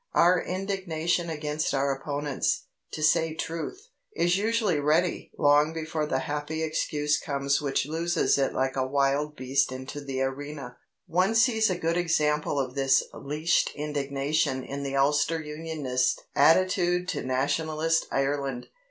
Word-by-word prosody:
Our 175 +1 +5
indignation 180 -3 -2
against 150 -1 -2
our 135 0 +1
opponents, 145 0 -2 0.3
to 155 - -4
say 160 +1 +3
truth, 165 - -5 0.3
is 175 +1 +2
usually 210 -5 +1
ready 155 +5 +1
long 145 +2 +4
before 160 -1 -3
the 130 - 0
happy 150 +3 -3
excuse 150 -1 0
comes 140 0 0
which 140 -2 0
looses 165 +3 +1
it 135 - +1
like 130 0 -1
a 130 - +1
wild 140 +2 +1
beast 135 +1 0
into 130 +2 -7
the 135 -1 -2
arena. 135 -1 -5 0.3
One 185 +6 +1
sees 225 -1 +4
a 185 - -1
good 165 0 0
example 150 -4 +1
of 130 -2 -2
this 135 -1 +3
leashed 155 +4 0
indignation 140 -1 -1
in 140 +2 -5
the 140 -1 -3
Ulster 145 +4 +2
Unionist 150 -5 -1 0.2
attitude 180 +3 +3
to 150 - -2
Nationalist 155 +5 0
Ireland. 135 -2 -1
150 Hz, 140 wpm, -27 LUFS, 140-165 Hz, 0.3 s, Our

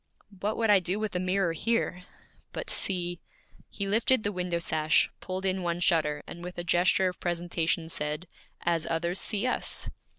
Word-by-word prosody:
'What 210 +3 -1
would 225 -2 +3
I 200 - +7
do 185 +3 0
with 215 -3 -3
a - - +2
mirror 185 -1 +1
here? 180 -2 0 0.5
But - - -2
see 175 -2 -1 0.3
' - - -28
He 200 - -4
lifted 225 +3 +3
the 205 - 0
window 180 -2 -1
sash, 155 -1 +2
pulled 185 0 -4
in 190 0 +1
one 170 -1 -1
shutter, 155 -4 +2
and 170 - -8
with 180 0 -7
a 175 - -2
gesture 175 +2 +3
of 180 - -4
presentation, 170 -1 -1
said, 150 +2 -3 0.4
'As 170 -2 +1
others 170 +2 0
see 210 +1 0
us!' 255 - -1
180 Hz, 185 wpm, -29 LUFS, 170-195 Hz, 0.5 s, I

